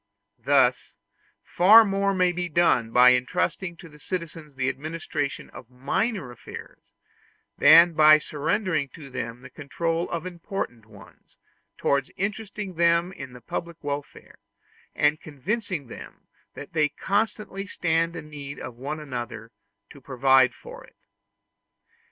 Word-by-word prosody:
Thus, 130 Hz, 0 st, +2 dB, 0.5 s
far 215 Hz, +6 st, +7 dB
more 200 Hz, 0 st, 0 dB
may 180 Hz, -1 st, +3 dB
be 175 Hz, 0 st, -4 dB
done 160 Hz, -9 st, +2 dB
by 125 Hz, +2 st, +7 dB
intrusting 170 Hz, +7 st, -1 dB
to 165 Hz, -, -12 dB
the 150 Hz, -2 st, -17 dB
citizens 165 Hz, -4 st, -6 dB
the 130 Hz, 0 st, -1 dB
administration 150 Hz, 0 st, -4 dB
of 125 Hz, -, -12 dB
minor 140 Hz, -, -2 dB
affairs 120 Hz, -, -12 dB, 0.6 s
than 165 Hz, +4 st, +8 dB
by 155 Hz, -1 st, +7 dB
surrendering 155 Hz, 0 st, -1 dB
to 140 Hz, -5 st, -12 dB
them 120 Hz, -1 st, -5 dB
the 125 Hz, -, -12 dB
control 165 Hz, +4 st, -3 dB
of 170 Hz, 0 st, -4 dB
important 170 Hz, -, -6 dB
ones, 105 Hz, -2 st, -18 dB, 0.4 s
towards 140 Hz, -1 st, 0 dB
interesting 200 Hz, 0 st, -4 dB
them 170 Hz, +1 st, +2 dB
in 135 Hz, -7 st, -9 dB
the 125 Hz, -, -12 dB
public 170 Hz, 0 st, -6 dB
welfare, 145 Hz, 0 st, -6 dB, 0.6 s
and 150 Hz, +1 st, +2 dB
convincing 175 Hz, -, -4 dB
them 120 Hz, -, -12 dB, 0.3 s
that 145 Hz, -, -10 dB
they 155 Hz, -2 st, +2 dB
constantly 200 Hz, 0 st, -2 dB
stand 165 Hz, -1 st, 0 dB
in 155 Hz, -, -8 dB
need 145 Hz, -1 st, -8 dB
one 135 Hz, +6 st, -6 dB
of 150 Hz, -, -10 dB
the -, -, -4 dB
other 120 Hz, -1 st, -4 dB
in 110 Hz, -, -9 dB
order 115 Hz, -, -19 dB, 0.4 s
to 140 Hz, -, -14 dB
provide 130 Hz, 0 st, +3 dB
for -, -, -12 dB
it. -, -, -20 dB
155 Hz, 140 wpm, -25 LUFS, 135-175 Hz, 0.6 s, than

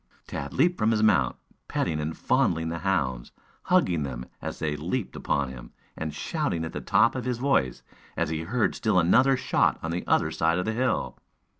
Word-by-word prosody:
Tad -, -, -5 dB
leaped 175 Hz, +6 st, +2 dB
from 110 Hz, -, +3 dB
his 110 Hz, -1 st, +2 dB
mount, 70 Hz, -12 st, +3 dB, 0.3 s
petting 80 Hz, -2 st, -1 dB
and 75 Hz, +1 st, -3 dB
fondling 95 Hz, -11 st, +1 dB
the 85 Hz, 0 st, -3 dB
hounds, 70 Hz, -11 st, -1 dB, 0.3 s
hugging 160 Hz, -, +3 dB
them 65 Hz, -3 st, -4 dB, 0.2 s
as -, -, -5 dB
they 75 Hz, -1 st, -2 dB
leaped 90 Hz, -, -3 dB
upon 70 Hz, -2 st, -1 dB
him, -, -, -10 dB, 0.2 s
and 80 Hz, 0 st, -4 dB
shouting 80 Hz, +2 st, -2 dB
at 80 Hz, -, -7 dB
the -, -, -4 dB
top 115 Hz, -, +3 dB
of 125 Hz, -2 st, -4 dB
his 125 Hz, -2 st, -1 dB
voice, 120 Hz, -, +1 dB, 0.3 s
as -, -, 0 dB
he 80 Hz, 0 st, -2 dB
heard 110 Hz, +7 st, 0 dB
still 110 Hz, -4 st, +1 dB
another 125 Hz, +10 st, +4 dB
shot -, -, +2 dB
on 80 Hz, -, -2 dB
the 90 Hz, +1 st, -2 dB
other 80 Hz, -, +2 dB
side 80 Hz, +1 st, +1 dB
of 90 Hz, -, -1 dB
the 110 Hz, -, -1 dB
hill. 125 Hz, +3 st, -1 dB
85 Hz, 195 wpm, -26 LUFS, 75-115 Hz, 0.3 s, another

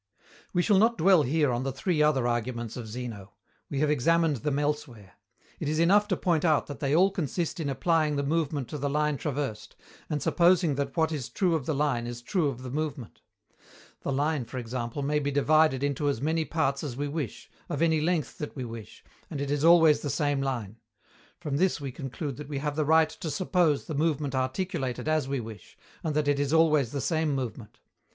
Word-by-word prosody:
We 175 Hz, -, +1 dB
shall 200 Hz, -1 st, +4 dB
not 230 Hz, +2 st, +3 dB
dwell 180 Hz, 0 st, +5 dB
here 145 Hz, 0 st, +1 dB
on 120 Hz, 0 st, -1 dB
the 135 Hz, +1 st, -2 dB
three 155 Hz, +4 st, 0 dB
other 145 Hz, -5 st, +3 dB
arguments 120 Hz, -1 st, -2 dB
of 120 Hz, -3 st, -6 dB
Zeno. 110 Hz, -4 st, -7 dB, 0.4 s
We 140 Hz, -1 st, -2 dB
have 150 Hz, -1 st, +2 dB
examined 160 Hz, +1 st, +2 dB
them 140 Hz, +5 st, -1 dB
elsewhere. 140 Hz, -9 st, -3 dB, 0.5 s
It -, -, -2 dB
is 155 Hz, -, 0 dB
enough 200 Hz, +6 st, +4 dB
to -, -, 0 dB
point 170 Hz, -5 st, +1 dB
out 155 Hz, -4 st, +3 dB
that 145 Hz, -, -8 dB
they 140 Hz, +1 st, +1 dB
all 190 Hz, +4 st, +5 dB
consist 175 Hz, 0 st, -2 dB
in 150 Hz, -3 st, -2 dB
applying 150 Hz, +3 st, +1 dB
the 140 Hz, -, 0 dB
movement 145 Hz, -3 st, -1 dB
to 150 Hz, -, -5 dB
the 140 Hz, +1 st, -1 dB
line 150 Hz, 0 st, +1 dB
traversed, 130 Hz, -8 st, -4 dB, 0.3 s
and 150 Hz, -2 st, -1 dB
supposing 170 Hz, +1 st, +3 dB
that 140 Hz, +4 st, -3 dB
what 160 Hz, -1 st, +2 dB
is 145 Hz, -6 st, -4 dB
true 180 Hz, -3 st, +1 dB
of 155 Hz, -5 st, -2 dB
the 155 Hz, -, 0 dB
line 135 Hz, -5 st, 0 dB
is 120 Hz, 0 st, -7 dB
true 175 Hz, +1 st, +1 dB
of 130 Hz, -2 st, -4 dB
the 125 Hz, -, -6 dB
movement. 145 Hz, -5 st, -4 dB, 0.8 s
The -, -, -3 dB
line, 145 Hz, +1 st, 0 dB
for 120 Hz, -, -8 dB
example, 120 Hz, +2 st, -4 dB
may 150 Hz, +2 st, +1 dB
be 145 Hz, -1 st, -1 dB
divided 145 Hz, -1 st, +3 dB
into 145 Hz, +1 st, 0 dB
as 140 Hz, -, -1 dB
many 160 Hz, +4 st, 0 dB
parts 140 Hz, -4 st, -1 dB
as 130 Hz, -5 st, -5 dB
we 145 Hz, +1 st, -2 dB
wish, 145 Hz, -6 st, -5 dB, 0.2 s
of -, -, 0 dB
any 160 Hz, -2 st, +3 dB
length 160 Hz, -3 st, -1 dB
that 150 Hz, -, -5 dB
we 130 Hz, -3 st, -4 dB
wish, 115 Hz, -2 st, -9 dB, 0.3 s
and 150 Hz, -, -5 dB
it 140 Hz, 0 st, -2 dB
is 145 Hz, 0 st, 0 dB
always 165 Hz, -2 st, +6 dB
the 145 Hz, -, -4 dB
same 145 Hz, -2 st, 0 dB
line. 120 Hz, -6 st, -3 dB, 0.6 s
From 150 Hz, -5 st, -2 dB
this 185 Hz, +1 st, +2 dB
we 140 Hz, -2 st, -5 dB
conclude 135 Hz, +2 st, -5 dB
that 150 Hz, -1 st, -8 dB
we 145 Hz, -, -3 dB
have 145 Hz, +1 st, -2 dB
the 155 Hz, -1 st, 0 dB
right 160 Hz, +1 st, +4 dB
to 160 Hz, -, -6 dB
suppose 165 Hz, -1 st, +1 dB
the 155 Hz, -, -5 dB
movement 150 Hz, -2 st, 0 dB
articulated 130 Hz, +1 st, -2 dB
as 155 Hz, -3 st, +1 dB
we 135 Hz, -1 st, -1 dB
wish, 110 Hz, -2 st, -10 dB, 0.3 s
and 155 Hz, -2 st, -2 dB
that 150 Hz, -1 st, +1 dB
it 145 Hz, -1 st, +2 dB
is 145 Hz, 0 st, 0 dB
always 155 Hz, -6 st, +4 dB
the 140 Hz, -, -3 dB
same 155 Hz, 0 st, 0 dB
movement. 125 Hz, -4 st, -6 dB
145 Hz, 215 wpm, -28 LUFS, 130-160 Hz, 0.8 s, always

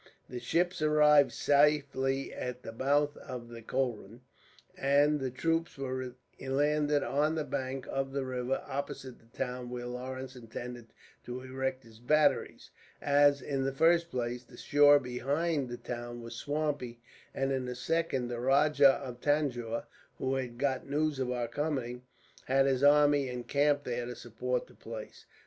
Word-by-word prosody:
"The 125 Hz, -, -6 dB
ships 170 Hz, +8 st, 0 dB
arrived 150 Hz, -2 st, +5 dB
safely 140 Hz, -2 st, +2 dB
at 125 Hz, 0 st, -5 dB
the -, -, -6 dB
mouth 145 Hz, +5 st, +1 dB
of 120 Hz, -2 st, -8 dB
the 115 Hz, -1 st, -9 dB
Kolrun, 120 Hz, -2 st, -3 dB, 0.5 s
and 145 Hz, +2 st, +3 dB
the 135 Hz, -1 st, -2 dB
troops 165 Hz, +6 st, -1 dB
were 130 Hz, -2 st, -4 dB, 0.2 s
landed 145 Hz, +2 st, +1 dB
on 150 Hz, +3 st, +1 dB
the 155 Hz, -, -1 dB
bank 130 Hz, -2 st, -3 dB
of 135 Hz, 0 st, -2 dB
the 135 Hz, -1 st, -2 dB
river 130 Hz, 0 st, -2 dB
opposite 135 Hz, -2 st, -5 dB
the 115 Hz, -, -24 dB
town, 125 Hz, -1 st, -3 dB
where 120 Hz, 0 st, -5 dB
Lawrence 130 Hz, +1 st, -6 dB
intended 120 Hz, 0 st, -8 dB, 0.4 s
to 125 Hz, +1 st, -5 dB
erect 130 Hz, 0 st, -3 dB
his 115 Hz, -1 st, -17 dB
batteries; 150 Hz, +6 st, +1 dB, 0.3 s
as, 145 Hz, 0 st, +4 dB
in 135 Hz, -2 st, -1 dB
the 135 Hz, -, 0 dB
first 170 Hz, +3 st, +4 dB
place, 120 Hz, -2 st, -3 dB
the 120 Hz, 0 st, -16 dB
shore 145 Hz, 0 st, +6 dB
behind 140 Hz, +3 st, -1 dB
the 120 Hz, -, -5 dB
town 120 Hz, 0 st, -6 dB
was 115 Hz, -, -8 dB
swampy, 145 Hz, -5 st, -2 dB, 0.3 s
and 135 Hz, 0 st, -1 dB
in 130 Hz, -1 st, -1 dB
the 125 Hz, 0 st, -4 dB
second 135 Hz, -1 st, -1 dB
the 120 Hz, -1 st, -4 dB
Rajah 140 Hz, +2 st, +5 dB
of 125 Hz, -2 st, -8 dB
Tanjore, 125 Hz, -6 st, 0 dB, 0.3 s
who 130 Hz, 0 st, -1 dB
had 125 Hz, -3 st, -3 dB
got 135 Hz, 0 st, -1 dB
news 150 Hz, 0 st, 0 dB
of 130 Hz, -1 st, -1 dB
our 120 Hz, -1 st, -1 dB
coming, 125 Hz, -2 st, -3 dB, 0.4 s
had 135 Hz, +1 st, +3 dB
his 135 Hz, -1 st, +1 dB
army 145 Hz, -1 st, +5 dB
encamped 140 Hz, +4 st, +1 dB
there 120 Hz, -1 st, -2 dB
to 125 Hz, -, -6 dB
support 125 Hz, +2 st, -3 dB
the -, -, -19 dB
place. 110 Hz, -1 st, -9 dB
135 Hz, 160 wpm, -31 LUFS, 125-145 Hz, 0.5 s, shore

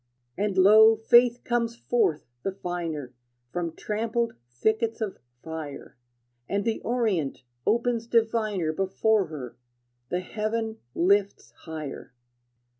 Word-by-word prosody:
And 200 Hz, 0 st, -1 dB
lo, 215 Hz, +4 st, +8 dB
Faith 240 Hz, +2 st, +4 dB
comes 235 Hz, -1 st, 0 dB
forth 235 Hz, -10 st, 0 dB, 0.2 s
the 195 Hz, -, -2 dB
finer 165 Hz, -8 st, -4 dB, 0.4 s
From 170 Hz, -2 st, -3 dB
trampled 230 Hz, +2 st, -1 dB, 0.2 s
thickets 220 Hz, -, 0 dB
of 215 Hz, -4 st, -4 dB, 0.2 s
fire, 155 Hz, -4 st, -7 dB, 0.5 s
And 200 Hz, 0 st, 0 dB
the 225 Hz, -1 st, 0 dB
orient 200 Hz, -, -1 dB, 0.2 s
opens 235 Hz, 0 st, +1 dB
diviner 220 Hz, -8 st, +1 dB
Before 195 Hz, +2 st, +1 dB
her; 140 Hz, -6 st, -8 dB, 0.5 s
the 180 Hz, -, -1 dB
heaven 220 Hz, +3 st, -3 dB, 0.2 s
lifts 200 Hz, +3 st, +2 dB
higher. 155 Hz, -5 st, -8 dB
210 Hz, 110 wpm, -27 LUFS, 170-225 Hz, 0.5 s, lo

